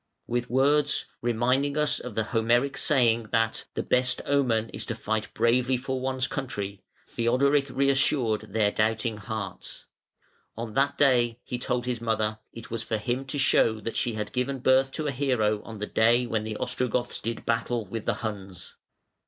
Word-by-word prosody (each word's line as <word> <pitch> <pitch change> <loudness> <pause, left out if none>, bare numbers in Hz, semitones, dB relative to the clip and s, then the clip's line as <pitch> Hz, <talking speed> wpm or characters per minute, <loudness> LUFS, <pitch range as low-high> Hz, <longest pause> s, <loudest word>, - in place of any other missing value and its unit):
With 120 0 -2
words, 140 +3 +2 0.2
reminding 125 +5 +1
us 150 0 +1
of 125 -4 -8
the 110 - +1
Homeric 120 +5 +1
saying 120 -5 +2
that 115 -1 +1
"the - - -1
best 125 0 +1
omen 120 -6 +1
is 105 - -5
to 115 - -2
fight 110 0 -2
bravely 125 +2 +2
for 130 +1 -3
one's 130 -1 0
country", 100 -8 -4 0.3
Theodoric 135 +4 +2
reassured 130 -5 +1
their 105 -1 +2
doubting 110 +1 0
hearts. 105 -3 -6 0.7
On 115 -1 -5
that 140 +3 +1
day, 120 -4 +3
he 125 - -4
told 125 0 -1
his 125 -2 -2
mother, 110 -1 0
it 115 -1 -11
was 115 -1 -2
for 110 -1 -2
him 125 +5 -2
to 135 +2 -3
show 115 -5 +3
that 115 - -5
she 120 - 0
had 105 -1 -4
given 135 +1 -1
birth 130 +1 +3
to 155 - -3
a 145 - 0
hero 120 -6 +1
on 115 -1 -9
the 105 - -3
day 120 +3 +3
when 110 -2 -2
the 110 -1 -4
Ostrogoths 125 -1 -2
did 115 +1 -4
battle 115 0 0
with 110 +3 -6
the - - +2
Huns. 95 -4 -7
120 Hz, 175 wpm, -27 LUFS, 110-130 Hz, 0.7 s, day